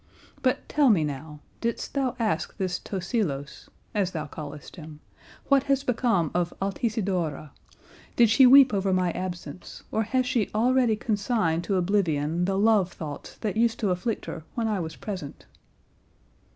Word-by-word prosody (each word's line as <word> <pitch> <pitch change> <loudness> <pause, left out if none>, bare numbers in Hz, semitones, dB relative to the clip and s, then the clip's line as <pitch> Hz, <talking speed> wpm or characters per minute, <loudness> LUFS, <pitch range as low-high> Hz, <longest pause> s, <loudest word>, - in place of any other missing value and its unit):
But 255 -1 0
tell 290 -3 +3
me 190 -8 +4
now, 150 +1 -6 0.2
didst 235 0 -3
thou 265 -3 0
ask 225 -3 -1
this 185 -3 -2
Tosilos, 175 - -3 0.2
as 200 -4 +1
thou 155 -2 -3
callest 150 0 -9
him, 155 -4 -10 0.5
what 275 -1 +5
has 275 0 +2
become 230 - +1
of 175 -1 0
Altisidora, 195 - -2 0.6
did 235 - +6
she 235 +4 +6
weep 270 -1 +8
over 195 -1 +1
my 180 -1 +2
absence, 175 -3 -7
or 220 - +1
has 255 +4 0
she 250 -4 0
already 245 0 +3
consigned 205 -6 0
to 200 - 0
oblivion 175 -4 +1
the 195 +1 0
love 205 -3 +3
thoughts 150 -3 -8
that 210 -3 -2
used 230 0 +2
to 205 -4 +1
afflict 180 +6 -2
her 160 - -6
when 230 -2 0
I 210 -3 0
was 160 -2 -5
present?" 185 -9 -7
195 Hz, 155 wpm, -26 LUFS, 165-230 Hz, 0.6 s, weep